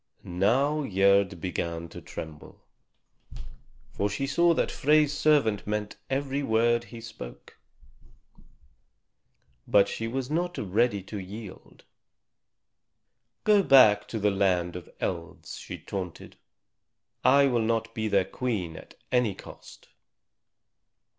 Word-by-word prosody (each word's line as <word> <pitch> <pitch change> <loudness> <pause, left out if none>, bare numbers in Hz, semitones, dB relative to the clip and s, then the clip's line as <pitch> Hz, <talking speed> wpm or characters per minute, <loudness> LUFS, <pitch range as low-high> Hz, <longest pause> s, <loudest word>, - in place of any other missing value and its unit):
Now 125 +12 +1
Gerd 100 -3 +2
began 85 -1 -3
to - - -10
tremble, 80 -2 -9 1.3
for 100 - -1
she 105 +7 -2
saw 170 +4 +3
that - - 0
Frey's 150 0 +3
servant 140 -11 +2
meant 105 0 -3
every 135 +1 -1
word 120 -1 +2
that 120 - -16
he 120 - -10
spoke. 110 - -11 2.1
But 100 -1 +5
she 115 - -4
was 130 +3 -4
not 175 +3 -1
ready 105 +1 0
to 100 +2 -7
yield. 100 +1 -10 1.6
"Go 210 -2 +5
back 125 - +6
to 115 - -4
the 105 -1 +2
land 90 -3 +1
of 90 - -8
Elves," 85 -3 -5
she - - -7
taunted; 90 -4 -7 0.9
"I 140 +1 +6
will 120 -4 +2
not 115 0 -1
be 110 -2 -2
their 100 -3 +2
Queen 100 -10 -3
at - - -13 0.2
any 125 -6 +2
cost." - - -13
110 Hz, 120 wpm, -27 LUFS, 95-135 Hz, 2.1 s, back